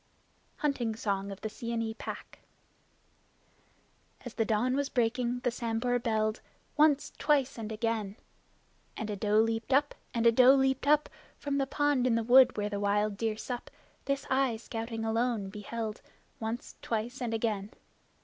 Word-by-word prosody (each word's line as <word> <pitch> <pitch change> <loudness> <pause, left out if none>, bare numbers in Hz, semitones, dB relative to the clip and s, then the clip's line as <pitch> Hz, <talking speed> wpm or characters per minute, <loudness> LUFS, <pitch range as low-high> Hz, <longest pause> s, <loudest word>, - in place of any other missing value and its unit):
Hunting 255 -7 -1
Song 200 -2 -2
of 195 - -9
the - - -2
Seeonee 230 0 -3
Pack - - -8 1.9
As 245 - -6
the 225 - 0
dawn 235 +4 +1
was 280 0 0
breaking 245 0 0
the 245 - 0
Sambhur 235 +1 -1
belled 215 -1 0 0.3
Once, 295 -2 +3
twice 280 -2 +2
and 220 -1 -5
again! 220 -2 -2 0.8
And 220 -1 -3
a - - -2
doe 210 +1 +1
leaped 225 +2 +1
up, 285 +2 +3 0.2
and 235 -1 -1
a 230 - +8
doe 255 +3 +7
leaped 265 0 +1
up 300 0 +4 0.3
From 280 -1 -2
the 270 - 0
pond 290 -3 +1
in 235 - +3
the 230 - +1
wood 250 +2 +6
where 205 0 0
the 205 -1 -3
wild 205 +1 +1
deer 220 +1 -1
sup. 245 +2 -5 0.4
This 275 0 -1
I, 260 -3 +1
scouting 225 0 -5
alone, 225 -2 0
beheld, 215 +2 -5 0.4
Once, 225 +2 -5
twice 235 +4 -3
and 240 -2 -1
again! 215 -3 -1
230 Hz, 160 wpm, -30 LUFS, 220-255 Hz, 1.9 s, a